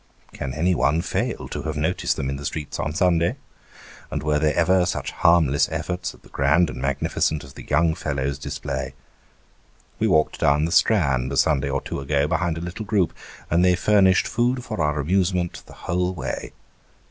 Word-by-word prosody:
Can 65 - -4
anyone 80 -1 +2
fail - - -2
to - - -4
have 80 -1 -4
noticed 80 +5 0
them 65 - -3
in 70 0 -3
the 70 - -8
streets 75 0 -4
on 75 - -1
Sunday? 85 -2 +2 0.7
And - - -4
were 75 -1 +1
there 75 -1 +1
ever 90 +2 +3
such - - -3
harmless 80 -4 +3
efforts 90 -1 -3
at - - -23
the - - -17
grand 75 +4 +2
and 60 +1 -7
magnificent 70 +2 0
as 70 -1 -12
the - - -11
young 80 +2 +3
fellows 70 -4 -3
display? - - -4 1.0
We - - +2
walked 75 0 +2
down 75 +2 +3
the 85 - -3
Strand, 70 - +2
a 70 - -2
Sunday 70 0 +2
or 70 0 -1
two - - -5
ago, 70 +1 +1
behind 85 0 0
a - - -5
little 90 +5 -5
group; 100 -4 +1 0.4
and 85 +2 +4
they 90 -1 +5
furnished 95 0 +4
food 125 +2 0
for 110 -8 -4
our 75 -1 0
amusement 90 +2 0
the - - -13
whole 90 +1 0
way. - - -5
80 Hz, 185 wpm, -23 LUFS, 70-90 Hz, 1.0 s, they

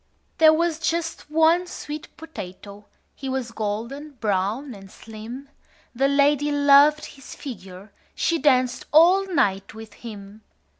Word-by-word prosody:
"There 315 -1 +8
was 330 0 0
just 325 -1 -3
one 325 +3 +3
sweet 300 -1 -7
potato. 205 - -10 0.3
He 270 - -7
was 260 -3 -3
golden 230 +8 -5
brown 220 +4 -2
and 195 -2 -13
slim: 225 +7 -10 0.5
The 270 +3 +1
lady 285 +1 +2
loved 290 +1 +5
his 275 -2 -12
figure. 195 -6 -10 0.2
She 335 0 0
danced 255 -3 +1
all 360 +5 +5
night 195 - 0
with 220 -1 -11
him. 210 -2 -11
270 Hz, 130 wpm, -23 LUFS, 215-305 Hz, 0.5 s, There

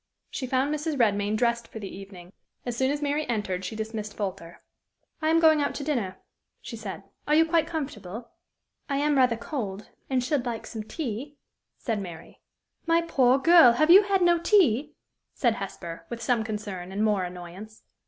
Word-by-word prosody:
She 260 - -4
found 265 +3 +1
Mrs. 305 0 -2
Redmain 205 -2 +2
dressed 235 0 0
for - - -10
the 200 -3 -7
evening. 190 -2 -11 0.3
As 245 -2 -3
soon 260 +2 +1
as 290 +1 -2
Mary 290 +1 0
entered, 200 -5 -2
she 185 +4 -5
dismissed 215 -1 -5
Folter. 185 -4 -5 0.7
"I 310 - +1
am 325 +1 +4
going 315 -2 +5
out 285 - -1
to 285 - -4
dinner," 235 -11 -2 0.4
she 230 - -8
said. 205 -3 -7 0.2
"Are 300 - +3
you 325 +1 +6
quite 325 -1 +2
comfortable?" 245 - -6 0.6
"I 275 - 0
am 295 +1 +2
rather 250 -3 +3
cold, 215 -5 -5 0.2
and 260 -2 +1
should 265 0 0
like 235 -2 -4
some 220 - -6
tea," 280 +2 -5 0.4
said 225 -4 -2
Mary. 170 -3 -10 0.5
"My 335 0 +3
poor 260 -6 +3
girl! 305 -4 +7
have 310 +7 +3
you 385 +3 +10
had 395 -2 +1
no 345 -1 +4
tea?" 310 - +3 0.4
said 240 -4 +2
Hesper, 170 -4 -7
with 235 - -5
some 235 -1 +1
concern, 205 -4 -5
and 200 +2 -1
more 205 -3 +1
annoyance. 180 +4 -9
235 Hz, 185 wpm, -26 LUFS, 205-295 Hz, 0.7 s, you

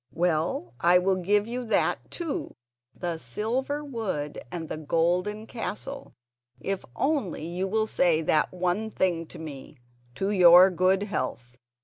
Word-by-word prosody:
Well, 160 -8 0
I 175 +1 +5
will 185 +1 +2
give 205 +3 +2
you 245 +2 -4
that 225 - 0
too, 335 -4 -4 0.4
the 170 -2 -3
silver 255 - -2
wood 205 - -3
and 165 -2 -5
the - - -5
golden 180 +7 0
castle, 270 +4 -6 0.4
if 195 -1 -3
only 270 - -1
you 180 +3 -2
will 215 +2 +1
say 170 -6 +2
that 155 0 +2
one 185 +4 -1
thing 170 -5 0
to - - -11
me: 150 -2 -9 0.4
'To 195 +8 -1
your 180 -1 +8
good 185 +2 +2
health. 125 - -4
185 Hz, 140 wpm, -27 LUFS, 165-215 Hz, 0.4 s, your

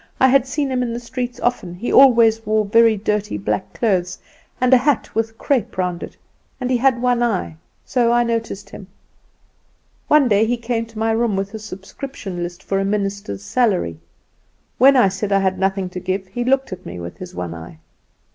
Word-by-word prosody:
I 260 - +5
had 270 0 +3
seen 285 0 -2
him 255 -1 0
in 240 -2 -2
the 235 - -4
streets 245 0 -5
often; 190 -8 -1
he 230 +7 -3
always 230 -4 +6
wore 215 0 +1
very 225 +1 +4
dirty 210 - -2
black 105 0 -3
clothes, 185 -5 0 0.4
and 255 +1 +3
a - - +9
hat 275 +3 0
with 225 0 -2
crepe 240 -7 -1
round 180 -2 -2
it, - - -9 0.4
and 255 0 -2
he 250 - +3
had 250 -1 +2
one 245 -1 +2
eye, 200 -9 -1 0.3
so 240 -2 +1
I 240 0 +3
noticed 225 -4 -3
him. 195 - -10 1.2
One 300 -3 +5
day 210 -1 +3
he 245 +1 0
came 230 -1 -2
to 225 -1 -15
my 225 +1 +1
room 225 -2 +1
with 195 +1 -3
a 220 - -5
subscription 200 -1 -7
list 175 +1 -6
for 195 - -1
a - - 0
minister's 195 - -3
salary. 180 - 0 0.8
When 270 +3 +7
I 245 -6 +5
said 195 +2 -3
I 195 - +4
had 190 -1 0
nothing 195 0 0
to 180 - -5
give 190 +2 -3
he 240 +5 -3
looked 265 -3 +1
at 185 0 -9
me 90 - -8
with 85 0 -8
his 180 0 -9
one 85 -2 -4
eye. 80 -1 -10
220 Hz, 205 wpm, -20 LUFS, 190-245 Hz, 1.2 s, a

